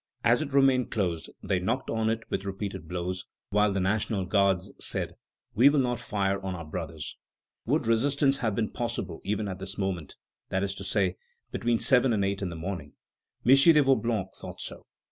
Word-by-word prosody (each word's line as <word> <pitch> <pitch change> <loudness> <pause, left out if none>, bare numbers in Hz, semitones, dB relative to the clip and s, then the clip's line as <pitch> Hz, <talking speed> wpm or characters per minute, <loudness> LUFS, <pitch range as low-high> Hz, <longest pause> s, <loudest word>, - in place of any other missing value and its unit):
As 120 +4 +4
it 150 -2 -4
remained 135 -2 +4
closed, 90 -7 -1
they 95 - +1
knocked 115 +9 -1
on 110 -1 +1
it 115 +1 -1
with 95 - -1
repeated 95 -3 -5
blows, 90 +1 -3 0.3
while 105 +1 +3
the 95 - 0
National 100 +1 0
Guards 95 -1 +2
said: - - -1 0.4
"We 125 +6 +7
will 145 - +2
not 125 -2 0
fire 100 -4 -1
on 95 -1 -3
our 85 -2 -7
brothers." 80 -1 -6 0.5
Would - - +2
resistance 135 +4 +2
have 110 -5 0
been 110 -1 -1
possible 120 -1 -3
even 105 0 -1
at 95 -1 -5
this 95 0 -6
moment; 95 -6 -3 0.3
that 95 +1 0
is 100 -1 -1
to - - -8
say, - - 0 0.3
between 120 -1 +1
seven 125 0 +4
and 100 -2 +1
eight 100 0 -1
in 95 - -1
the 85 - -6
morning? 80 -3 -5 0.5
M. 125 - +5
de 150 +5 +7
Vaublanc 115 -7 +1
thought - - -9
so. - - -7
100 Hz, 190 wpm, -28 LUFS, 95-120 Hz, 0.5 s, We